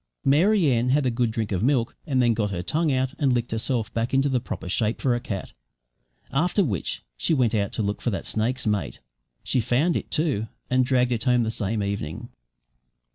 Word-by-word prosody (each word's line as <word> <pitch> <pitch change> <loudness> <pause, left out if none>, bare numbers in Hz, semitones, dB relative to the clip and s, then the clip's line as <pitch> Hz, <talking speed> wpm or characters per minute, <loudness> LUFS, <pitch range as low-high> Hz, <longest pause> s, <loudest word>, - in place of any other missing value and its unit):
Mary 175 +8 +4
Ann 120 +1 +1
had 140 +1 +2
a 125 - +2
good 120 0 +1
drink 110 -1 -3
of 95 -2 0
milk, 125 -1 +1
and 135 -4 +1
then 120 -2 +4
got 105 -2 0
her 90 -3 -3
tongue 160 - +1
out 130 0 0
and 140 -4 +3
licked 120 0 -1
herself 115 0 -1
back 115 +3 -1
into 135 +1 +3
the 130 -2 +1
proper 115 - -6
shape 110 +4 0
for 130 - +2
a 120 - 0
cat; 100 -5 -5 0.8
after 175 +8 +2
which 100 - -2
she 160 - +1
went 125 -5 +2
out 100 -3 0
to 110 - -1
look 100 0 -2
for - - 0
that 100 - -3
snake's 125 +4 -1
mate. 105 -2 -1 0.5
She 130 - +1
found 130 +9 +1
it, - - -3
too, 145 -9 0 0.2
and 130 0 +4
dragged 125 -1 +2
it 115 0 -1
home 125 -2 +3
the 110 - -1
same 110 -1 -1
evening. 100 -6 -4
120 Hz, 215 wpm, -25 LUFS, 110-135 Hz, 0.8 s, Mary